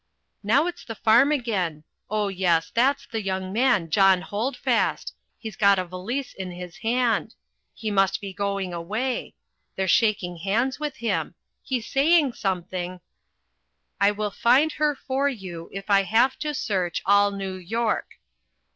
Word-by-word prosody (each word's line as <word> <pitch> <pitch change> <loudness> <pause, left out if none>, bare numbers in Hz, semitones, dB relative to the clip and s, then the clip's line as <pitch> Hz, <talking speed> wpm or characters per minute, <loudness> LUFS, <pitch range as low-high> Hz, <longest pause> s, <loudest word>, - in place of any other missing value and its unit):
Now 245 +9 +3
it's 355 - -5
the 225 - -7
farm 235 +7 +4
again 195 - -1 0.3
oh, 210 0 0
yes, 180 -4 +1
that's 265 +4 +2
the 225 -1 -4
young 190 -1 -3
man 225 -9 +2
John 190 0 +4
Holdfast 225 +9 -1 0.2
he's 220 -4 -8
got 200 0 +4
a 185 - -1
valise 220 +10 -5
in 190 -1 -6
his 180 -1 -9
hand 230 -1 0 0.4
he 215 -2 -4
must 195 -1 +2
be 195 -2 -7
going 200 -2 -2
away 215 +10 -3 0.4
they're 190 0 -1
shaking 190 -4 +2
hands 225 - 0
with 300 -2 -3
him 235 - -2 0.3
he's 250 -4 -3
saying 290 0 +3
something 180 -2 -3 1.0
"I 200 - +5
WILL 210 0 -2
FIND 260 +9 +3
HER 300 -1 0
FOR 275 +1 -1
YOU 185 -9 -7
IF 195 0 -7
I 200 -1 +5
HAVE 225 +7 +2
TO 300 -1 -3
SEARCH 185 -8 -1
ALL 200 +1 +5
NEW 195 -1 -5
YORK." 220 +5 -2
205 Hz, 150 wpm, -25 LUFS, 190-245 Hz, 1.0 s, I